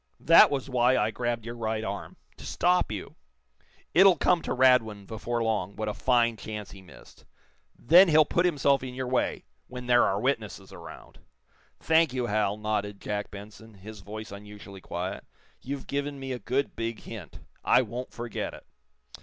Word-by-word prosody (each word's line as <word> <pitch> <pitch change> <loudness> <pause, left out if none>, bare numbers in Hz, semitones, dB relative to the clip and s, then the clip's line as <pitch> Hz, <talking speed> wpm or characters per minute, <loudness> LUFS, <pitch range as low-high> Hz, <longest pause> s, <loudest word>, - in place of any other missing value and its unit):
That - - +7
was 140 -2 -3
why 125 -1 +2
I 105 +1 +1
grabbed 120 -1 -3
your 120 - -5
right 110 -2 -3
arm 100 -1 -6 0.2
to - - -12
stop 180 -5 +1
you. 100 -3 -7 0.8
It'll 190 0 +6
come 175 +3 +2
to - - -5
Radwin 125 -6 +3
before 115 +3 -3
long, 105 -4 -1
what 110 0 -4
a 105 - -2
fine 120 -1 +2
chance 105 -1 -7
he 95 - -12
missed. 95 - -17 0.5
Then 175 +9 +6
he'll 155 -2 +5
put 175 +4 +1
himself 140 -4 +2
in 130 -1 -7
your 130 0 -3
way 125 0 -1 0.2
when 125 0 -8
there 120 0 +4
are 95 - +1
witnesses 110 -6 -3
around." - - -12 0.6
"Thank 160 -3 +3
you, 125 -2 -1
Hal," 105 -2 0
nodded 105 -1 -3
Jack 105 0 -4
Benson, 105 +2 -12
his 105 +2 -11
voice 110 +2 -8
unusually 100 -1 -11
quiet. 90 +3 -5 0.4
"You've 135 +1 -6
given 140 0 -3
me 135 0 -6
a 125 - -4
good, 135 +4 -2
big 115 0 -4
hint. 100 -10 -10 0.2
I 130 - +4
won't 120 +3 -6
forget 120 -1 -5
it. - - -15
115 Hz, 175 wpm, -27 LUFS, 105-130 Hz, 0.8 s, That